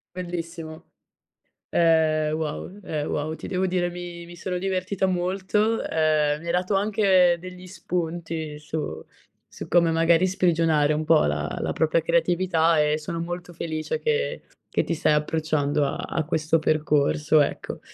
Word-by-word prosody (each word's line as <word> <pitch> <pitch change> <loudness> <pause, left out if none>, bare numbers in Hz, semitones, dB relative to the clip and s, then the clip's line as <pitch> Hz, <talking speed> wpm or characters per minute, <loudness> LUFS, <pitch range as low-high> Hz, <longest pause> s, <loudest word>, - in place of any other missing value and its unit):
Bellissimo. 165 -3 -6 0.8
Ehm, 155 -2 +3
wow 155 +2 -4
ehm, 150 -3 -3
wow, 155 +2 -2
ti - - -10
devo 185 0 0
dire, 175 -1 0
mi 175 -1 -8
sono 180 +1 -3
divertita 190 +1 -1
molto, 190 +4 0
ehm, 155 -2 +1
mi 165 - -12
hai 170 - -1
dato 180 +3 +1
anche 195 -3 +4
degli 185 +1 -10
spunti 165 -4 -4
su 150 0 -5 0.4
su - - -9
come 170 -1 +4
magari 165 +2 +3
sprigionare 165 -5 +2
un 155 +1 -1
po' 160 0 +5
la 75 +1 -2
la - - -1
propria 160 +1 +2
creatività, 170 -1 +2
e 150 0 +2
sono 165 +2 -5
molto 175 +1 -5
felice, 160 - -3
che 485 +2 -1 0.3
che - - +1
ti 170 - -1
stai 160 - +1
approcciando 150 -1 0
a 140 - -2
a 160 - -2
questo 160 0 +1
percorso, 150 0 +2
ecco. 145 - -3
165 Hz, 145 wpm, -24 LUFS, 155-180 Hz, 0.8 s, po